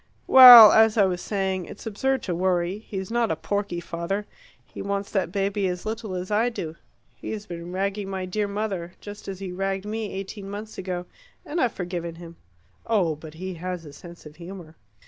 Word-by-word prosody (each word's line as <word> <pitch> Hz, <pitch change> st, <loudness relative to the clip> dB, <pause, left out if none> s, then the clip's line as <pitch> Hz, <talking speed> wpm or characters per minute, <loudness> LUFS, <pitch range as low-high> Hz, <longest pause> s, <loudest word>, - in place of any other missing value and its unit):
Well, 245 Hz, -4 st, +11 dB
as 220 Hz, 0 st, +5 dB
I 200 Hz, -, +5 dB
was 180 Hz, -2 st, -2 dB
saying, 190 Hz, -3 st, -2 dB
it's 205 Hz, -, -11 dB
absurd 265 Hz, +4 st, -1 dB
to 180 Hz, -, -2 dB
worry; 180 Hz, +2 st, 0 dB
he's 195 Hz, -2 st, -7 dB
not 235 Hz, -1 st, +1 dB
a -, -, 0 dB
porky 200 Hz, -4 st, -3 dB
father. 175 Hz, +4 st, -4 dB, 0.4 s
He -, -, -9 dB
wants 200 Hz, 0 st, -3 dB
that 190 Hz, -4 st, -1 dB
baby 195 Hz, 0 st, -1 dB
as 180 Hz, +1 st, -4 dB
little 220 Hz, -3 st, -4 dB
as 180 Hz, +2 st, -5 dB
I 220 Hz, +4 st, +2 dB
do. 165 Hz, -9 st, -6 dB, 0.4 s
He's 210 Hz, -1 st, -6 dB
been 170 Hz, -2 st, -8 dB
ragging 195 Hz, +1 st, -2 dB
my 190 Hz, -1 st, -4 dB
dear 205 Hz, +3 st, -2 dB
mother 200 Hz, -4 st, -4 dB
just 205 Hz, 0 st, -10 dB
as 195 Hz, -1 st, -5 dB
he 190 Hz, -1 st, -6 dB
ragged 195 Hz, +1 st, -3 dB
me 215 Hz, -1 st, -4 dB
eighteen 195 Hz, +1 st, -7 dB
months 210 Hz, +2 st, -7 dB
ago, 180 Hz, -1 st, -4 dB, 0.4 s
and 330 Hz, +2 st, -2 dB
I've 245 Hz, -, +1 dB
forgiven 175 Hz, -2 st, -5 dB
him. 170 Hz, 0 st, -12 dB, 0.5 s
Oh, 185 Hz, -9 st, +1 dB
but 155 Hz, +1 st, -12 dB
he 185 Hz, +3 st, -6 dB
has 180 Hz, 0 st, -6 dB
a 145 Hz, -, -11 dB
sense 170 Hz, +1 st, -13 dB
of 150 Hz, 0 st, -13 dB
humour!" 170 Hz, -2 st, -10 dB
195 Hz, 195 wpm, -25 LUFS, 175-210 Hz, 0.5 s, Well